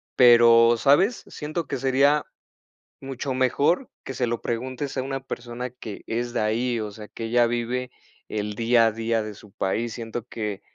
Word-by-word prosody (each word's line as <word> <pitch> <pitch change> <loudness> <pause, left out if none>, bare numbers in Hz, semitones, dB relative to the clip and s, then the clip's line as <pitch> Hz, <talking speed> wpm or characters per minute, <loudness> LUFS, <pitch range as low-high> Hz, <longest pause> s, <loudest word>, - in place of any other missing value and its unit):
pero, 120 -1 +7
¿sabes?, 170 - +3
siento 155 +3 -4
que - - -3
sería 135 +3 +3 0.8
mucho 135 0 -4
mejor 140 - +1
que 135 - -6
se 125 -1 -1
lo 120 0 -2
preguntes 130 +4 -4
a 130 - 0
una 135 0 -4
persona 125 -1 -6
que 115 -4 -9
es 120 +1 -2
de - - 0
ahí, 115 +3 0
o 105 -1 -5
sea, 105 +1 -10
que 115 +2 -7
ella 120 +1 +3
vive 120 +2 -2 0.4
el 105 -1 -3
día 115 +1 +4
a - - +1
día 115 0 -1
de 110 - -6
su 105 +1 -16
país. 110 +5 -2
Siento 115 -1 -5
que 105 -5 -4
120 Hz, 180 wpm, -24 LUFS, 115-130 Hz, 0.8 s, pero